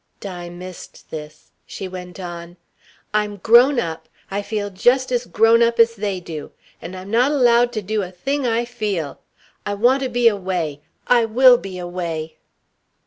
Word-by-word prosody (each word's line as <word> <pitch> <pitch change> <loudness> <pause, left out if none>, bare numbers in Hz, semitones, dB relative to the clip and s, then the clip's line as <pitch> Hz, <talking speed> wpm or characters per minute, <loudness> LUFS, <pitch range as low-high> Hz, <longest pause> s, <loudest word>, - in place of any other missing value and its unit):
Di 175 -3 -7
missed 180 +1 -11
this. 150 -1 -9 0.2
She 190 - -6
went 180 0 -9
on: 175 -1 -8 0.6
"I'm 210 -1 0
grown 240 +6 +5
up. 160 -6 -5 0.2
I 200 +1 -1
feel 205 -1 -3
just 250 +7 +2
as 245 -1 -1
grown 225 +5 +4
up 235 0 +2
as 230 0 +5
they 200 -3 -2
do. 160 -4 -7 0.3
And 180 +3 -7
I'm 190 +2 -9
not 245 +5 +3
allowed 245 -3 +4
to 215 -3 -3
do 215 +2 -1
a 185 - -5
thing 270 +9 -2
I 235 +1 +1
feel. 210 - -3 0.4
I 205 - -3
want 245 +6 +3
to 260 - -1
be 240 -1 +3
away 180 -8 -1 0.2
I 240 -2 +4
will 245 +2 +6
be 195 -5 -7
away!" 170 -3 -5
205 Hz, 170 wpm, -21 LUFS, 180-235 Hz, 0.6 s, will